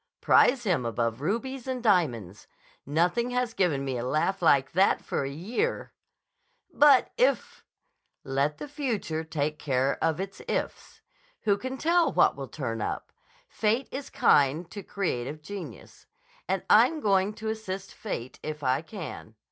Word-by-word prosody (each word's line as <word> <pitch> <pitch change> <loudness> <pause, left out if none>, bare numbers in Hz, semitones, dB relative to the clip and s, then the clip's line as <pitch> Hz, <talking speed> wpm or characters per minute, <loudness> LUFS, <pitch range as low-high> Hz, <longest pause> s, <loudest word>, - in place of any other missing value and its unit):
Prize 250 -1 +4
him 180 - +1
above 115 +1 -2
rubies 240 - -3
and 255 -2 -3
diamonds. 120 - +1 0.4
Nothing 175 - +1
has 250 -2 -1
given 150 -10 +1
me 130 -2 -2
a - - -3
laugh 160 +9 0
like 140 -5 +4
that 190 +4 +3
for - - -2
a 135 - -3
year." 220 - -3 0.8
"But 285 -3 +5
if—" - - +1 0.6
"Let 140 +3 0
the - - -7
future 235 - -3
take 155 -1 -2
care 135 -1 0
of 160 0 +1
its 195 0 -6
ifs. - - -4 0.4
Who 205 - +2
can 260 +5 -5
tell 335 +3 +3
what - - +4
will 135 -1 -6
turn 115 -3 -4
up? - - -4 0.4
Fate 225 +5 0
is 275 +1 -6
kind 145 +4 +3
to 205 - -6
creative 155 -8 -3
genius. 200 +2 -9 0.4
And - - -1
I'm 320 - +5
going 200 -3 +2
to 220 0 -4
assist 195 -3 -5
Fate 130 - -6
if 155 -1 -6
I 130 +2 +2
can. 160 - -8
180 Hz, 150 wpm, -27 LUFS, 140-225 Hz, 0.8 s, But